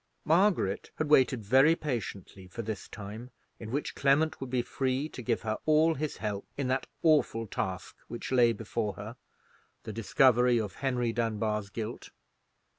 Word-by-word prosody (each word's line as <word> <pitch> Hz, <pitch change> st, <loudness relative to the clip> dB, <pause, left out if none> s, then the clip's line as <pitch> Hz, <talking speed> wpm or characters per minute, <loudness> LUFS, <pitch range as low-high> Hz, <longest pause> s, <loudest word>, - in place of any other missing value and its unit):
Margaret 170 Hz, -, +2 dB
had 155 Hz, -1 st, -2 dB
waited 130 Hz, -5 st, +4 dB
very 135 Hz, +9 st, +5 dB
patiently 100 Hz, -, -5 dB
for 115 Hz, +6 st, -6 dB
this 110 Hz, -1 st, -5 dB
time, 105 Hz, +4 st, -8 dB, 0.3 s
in 110 Hz, -, -7 dB
which 140 Hz, +5 st, -2 dB
Clement 140 Hz, +3 st, +2 dB
would 135 Hz, -, -5 dB
be 125 Hz, -1 st, 0 dB
free 130 Hz, +3 st, -1 dB
to 130 Hz, -, -8 dB
give 120 Hz, -1 st, -1 dB
her 110 Hz, 0 st, -2 dB
all 155 Hz, +1 st, +5 dB
his 155 Hz, 0 st, -4 dB
help 105 Hz, -2 st, -4 dB
in 140 Hz, -2 st, -1 dB
that 130 Hz, +1 st, 0 dB, 0.2 s
awful 150 Hz, -8 st, +3 dB
task 95 Hz, -3 st, -4 dB
which 120 Hz, -, -6 dB
lay 120 Hz, -2 st, +5 dB
before 110 Hz, -1 st, -3 dB
her—the 110 Hz, 0 st, -12 dB
discovery 125 Hz, +1 st, +4 dB
of 105 Hz, -4 st, -3 dB
Henry 125 Hz, -4 st, 0 dB
Dunbar's 110 Hz, -2 st, -1 dB
guilt. 110 Hz, +2 st, -6 dB
120 Hz, 155 wpm, -30 LUFS, 110-135 Hz, 0.3 s, very